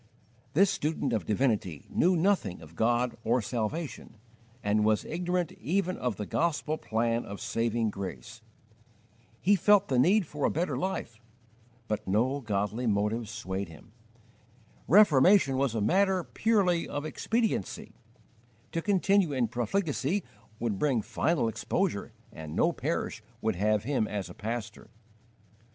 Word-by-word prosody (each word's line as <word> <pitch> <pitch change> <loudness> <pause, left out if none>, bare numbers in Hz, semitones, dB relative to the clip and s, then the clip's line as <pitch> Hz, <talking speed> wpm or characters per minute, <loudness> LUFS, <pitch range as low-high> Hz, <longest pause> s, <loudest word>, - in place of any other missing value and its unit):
This 195 +4 +5
student 145 -4 -1
of 105 -7 -1
divinity 105 - 0
knew 180 +2 +3
nothing 170 - +1
of 80 +1 -14
God 120 +3 +1
or 120 +3 +2
salvation, 120 +3 -4 0.5
and 105 +1 +2
was 105 -1 +2
ignorant 180 0 -1
even 185 +2 0
of 125 -4 -2
the 105 - -5
gospel 155 - -1
plan 115 +1 0
of 100 - -8
saving 115 -1 0
grace. 105 +4 -7 1.0
He 205 +3 +4
felt 200 +1 +4
the 130 -2 +2
need 185 +9 +4
for 145 -1 -6
a - - +4
better 170 +4 -1
life, 150 - -4 0.7
but 105 -2 -3
no 120 +8 +1
godly 105 +2 -1
motives 105 +2 0
swayed 100 -4 -4
him. 80 +7 -15 1.0
Reformation 175 -4 +6
was 130 -3 0
a 110 - 0
matter 190 - +2
purely 190 -4 +1
of 145 +1 -4
expediency: 225 - -2 0.8
to 165 - -1
continue 195 -3 +2
in 125 -4 +1
profligacy 150 - -1 0.4
would 110 -5 -2
bring 130 -7 +1
final 160 -1 0
exposure, 115 - -1 0.2
and 80 0 -8
no 170 - +3
parish 155 -7 -3 0.2
would 110 -3 0
have 105 +1 +1
him 125 -4 0
as 95 -4 -4
a - - -9
pastor. 110 +2 -5
125 Hz, 135 wpm, -29 LUFS, 110-170 Hz, 1.0 s, Reformation